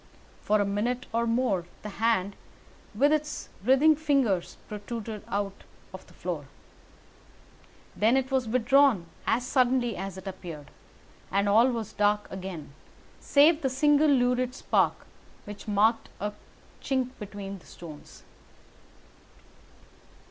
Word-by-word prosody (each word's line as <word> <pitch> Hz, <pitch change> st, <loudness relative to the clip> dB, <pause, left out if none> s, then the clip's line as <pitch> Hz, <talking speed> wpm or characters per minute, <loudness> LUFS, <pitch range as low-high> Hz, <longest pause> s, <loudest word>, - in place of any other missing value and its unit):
For 210 Hz, 0 st, +2 dB
a 205 Hz, -, +2 dB
minute 230 Hz, +6 st, -1 dB
or 235 Hz, +1 st, +1 dB
more 230 Hz, -7 st, 0 dB, 0.2 s
the 210 Hz, -, -5 dB
hand, 205 Hz, -4 st, +1 dB, 0.6 s
with 285 Hz, +7 st, +4 dB
its 305 Hz, -1 st, -2 dB
writhing 270 Hz, +7 st, +5 dB
fingers, 275 Hz, -, 0 dB
protruded 215 Hz, 0 st, -6 dB
out 200 Hz, -1 st, -3 dB, 0.3 s
of -, -, -10 dB
the -, -, -19 dB
floor. -, -, -4 dB, 1.5 s
Then 225 Hz, +5 st, +3 dB
it 265 Hz, 0 st, -1 dB
was 260 Hz, -3 st, +1 dB
withdrawn 255 Hz, -3 st, +4 dB, 0.2 s
as 240 Hz, +2 st, +1 dB
suddenly 250 Hz, -3 st, +2 dB
as 195 Hz, 0 st, -6 dB
it 190 Hz, -, -10 dB
appeared, 175 Hz, -6 st, -8 dB, 0.6 s
and 200 Hz, +1 st, +1 dB
all 220 Hz, +5 st, +5 dB
was 230 Hz, -4 st, -4 dB
dark 210 Hz, 0 st, +2 dB
again 185 Hz, -6 st, -7 dB, 0.5 s
save 300 Hz, +3 st, +4 dB
the 265 Hz, -, +1 dB
single 295 Hz, +3 st, +3 dB
lurid 250 Hz, -1 st, +2 dB
spark -, -, +1 dB, 0.4 s
which 205 Hz, +1 st, -9 dB
marked 215 Hz, +2 st, +2 dB
a 210 Hz, +1 st, -2 dB, 0.5 s
chink 260 Hz, -2 st, 0 dB
between 200 Hz, -2 st, -7 dB
the -, -, -20 dB
stones. 155 Hz, -4 st, -12 dB
225 Hz, 125 wpm, -28 LUFS, 200-260 Hz, 1.5 s, writhing